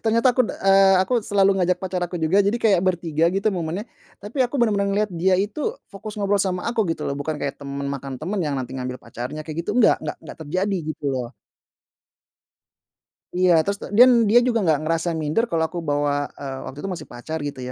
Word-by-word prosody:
ternyata 230 +3 +3
aku, - - +2
eee, 195 0 +4
aku 250 - -1
selalu 195 -1 +3
ngajak 180 0 +1
pacar 185 -1 -2
aku 175 0 -3
juga, 160 +5 +2
jadi 205 +4 0
kayak 205 -6 +3
bertiga, 165 -3 0
gitu, 195 +4 0
momennya, 175 +4 -3 0.4
tapi 210 +7 -7
aku 245 +2 -2
benar-benar 205 -4 +2
ngelihat 205 +1 0
dia 185 +3 +2
itu 205 +9 -2 0.3
fokus 210 +2 -8
ngobrol 200 0 +1
sama 185 -2 -2
aku, 235 -1 0
gitu, 160 -2 -3
loh, 140 - -2
bukan 150 +1 -3
kayak 140 0 -4
teman 140 0 -5
makan 140 -2 -5
teman 190 +5 -2
yang 150 -3 -1
nanti 130 0 -5
ngambil 125 0 -4
pacarnya, 125 +6 -7
kayak 160 +2 -4
gitu, - - -3
enggak 225 -4 +5
enggak - - -4
engga - - -10
terjadi, 185 +6 -1
gitu, 155 - -9
loh. 125 -2 -3 2.1
Iya, 180 0 +3
terus 200 0 -1
ta - - -6
dan 245 +5 +7 0.2
dia 235 +3 +7
juga 230 -2 +2
nggak 160 -5 +2
ngerasa 165 +1 0
minder 155 +8 0
kalau 165 -1 +1
aku 175 +2 -5
bawa, 145 -1 0
eee, 135 -2 -6
waktu 135 - -9
itu 195 - -3
masih - - -8
pacar, 125 +7 -6
gitu, 145 -2 -5
180 Hz, 205 wpm, -22 LUFS, 145-200 Hz, 2.1 s, dan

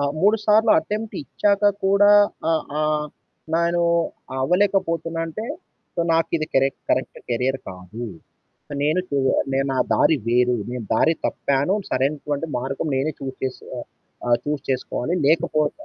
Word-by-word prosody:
ఆ! - - +1 0.2
3 210 +3 +5
సార్లు 220 +1 +4
అటెంప్ట్ 210 +5 -4
ఇచ్చాక 200 +9 0 0.2
కూడా 200 +1 +5 0.4
ఆహ్, 160 -2 +2 0.2
ఆహ్, 150 0 0 0.5
నేను 170 +1 +2 0.6
అవ్వలేకపోతున్నాంటే, 165 0 0 0.5
సో - - -11
నాకిది 165 -1 +1
కరెక్ 135 0 +2
కరెక్ట్ - - 0
కెరియర్ 125 +3 0
కాదు. 90 +6 -8 0.8
నేను 155 +5 +2
చూ 140 - -2 0.4
నేను 135 +1 +1
నా 130 - -1
దారి 160 - +4
వేరు 125 +1 +3 0.2
నేను 125 -2 -4
దారి 160 +8 +3
తప్పాను 140 +7 0
సరైనటువంటి 145 +3 -1
మార్గం 135 +4 -3
నేనే 135 +4 0
చూజ్ 135 -1 -5
చేస్ 130 -1 -3 0.2
ఆహ్, - - -7 0.4
ఆ! - - -1 0.2
చూస్ 150 -1 -2
చేసుకోవాలి. 130 +4 -1
లేకపోతే 155 - +1
155 Hz, 135 wpm, -22 LUFS, 135-175 Hz, 0.8 s, 3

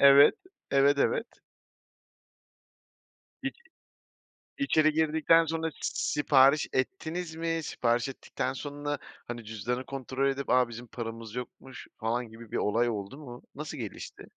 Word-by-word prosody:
evet, 140 0 +9 0.4
evet, 140 +1 +5
evet. 225 - +2 2.2
İç 270 0 -3 1.0
içeri 155 - +3
girdikten 160 +1 +4
sonra 160 0 -2
s - - -22 0.5
sipariş 140 +1 +5
ettiniz 165 +3 -2
mi? 165 0 -1
Sipariş 120 -2 0
ettikten 130 0 -3
sonra 145 +1 -4 0.3
hani 120 -2 -6
cüzdanı 115 +4 -3
kontrol 135 0 -1
edip, 135 0 -3
"A! 125 -1 +4
Bizim 120 +1 -8
paramız 115 -1 -6
yokmuş!" 125 +1 -8
falan 115 +2 -1
gibi 115 0 -12
bir - - -1
olay 115 +3 +2
oldu 105 +4 -4
mu? 125 -5 -9
Nasıl 150 +1 -6
gelişti? 110 -5 -7
135 Hz, 125 wpm, -29 LUFS, 120-155 Hz, 2.2 s, evet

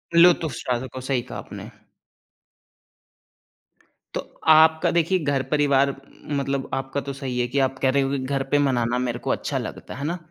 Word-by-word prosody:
लुत्फ 170 0 +6
उफ़्स 140 -7 -5
ठा 125 - +2
सको, 130 0 -7
सही 130 -1 -1
कहा 125 - -8
आपने। - - -9 2.5
तो, - - -1 0.3
आपका 160 0 +6
देखिए 175 +2 +2
घर 140 -3 0
परिवार 140 -2 +3 0.5
मतलब 135 -1 -2
आपका 135 +1 -2
तो 140 - -5
सही 135 -2 -4
है 120 - +1
कि 135 +3 -1
आप 130 0 -4
कह 130 - +3
रहे 140 +1 +2
हो 135 - -1
कि 140 - 0
घर 135 +1 -1
पे 145 - +4
मनाना 120 -1 0
मेरे 120 -1 -2
को - - -5
अच्छा - - -2
लगता - - -6
है, - - -9
है 140 - -3
ना? 175 +3 -2
135 Hz, 190 wpm, -23 LUFS, 130-145 Hz, 2.5 s, लुत्फ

